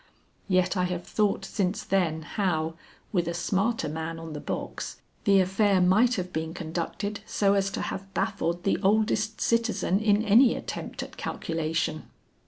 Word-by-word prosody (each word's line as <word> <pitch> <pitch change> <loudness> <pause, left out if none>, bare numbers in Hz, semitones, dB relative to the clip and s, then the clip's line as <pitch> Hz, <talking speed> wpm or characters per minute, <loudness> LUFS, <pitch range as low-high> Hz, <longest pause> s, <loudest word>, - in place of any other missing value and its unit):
Yet 185 -1 +2
I 180 -1 +2
have 180 -1 -3
thought 205 -2 0
since 195 -1 -1
then 170 -5 0
how, 165 -4 -1 0.4
with 175 -5 +1
a 170 - -2
smarter 195 +4 0
man 160 +2 -4
on 165 -1 -7
the 150 - -5
box, - - -5 0.3
the 200 -2 +6
affair 195 +1 +3
might 210 +8 +4
have 180 -2 -4
been 160 +1 -3
conducted 175 +5 -3
so 200 -1 +2
as 195 -1 +2
to - - -4
have 195 0 -5
baffled 170 +1 -1
the 195 - +1
oldest 215 +1 +2
citizen 230 -5 +1
in 210 0 +3
any 230 +4 +6
attempt - - -5
at - - -11
calculation. 160 -1 -2
190 Hz, 160 wpm, -27 LUFS, 165-205 Hz, 0.4 s, the